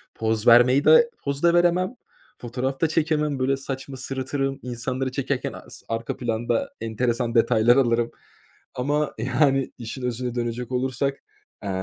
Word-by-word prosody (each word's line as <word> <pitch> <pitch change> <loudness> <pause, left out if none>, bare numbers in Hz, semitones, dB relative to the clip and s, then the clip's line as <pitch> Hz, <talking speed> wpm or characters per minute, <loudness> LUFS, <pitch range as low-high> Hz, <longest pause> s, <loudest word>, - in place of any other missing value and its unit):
Poz 110 +1 -1
vermeyi 125 +4 +6
de 475 0 +7
poz 140 +2 -3
da 170 0 +5
veremem. 175 +5 +2 0.5
Fotoğraf 130 +3 -3
da 165 - +4
çekemem 150 -3 0
böyle 135 +1 +1
saçma 135 0 -6
sırıtırım, 135 +1 -3
insanları 125 +2 -3
çekerken 135 -1 -2
as - - -12
arka 115 0 -3
planda 120 - -1
enteresan 120 +1 -1
detaylar 115 +1 +4
alırım 120 -2 +2 0.6
ama 145 +3 0
yani, 135 +3 +1
işin 120 +2 -7
özüne 125 0 -3
dönecek 120 0 -3
olursak, 130 +2 -1 0.4
eee, 100 - -4
130 Hz, 135 wpm, -24 LUFS, 120-140 Hz, 0.6 s, de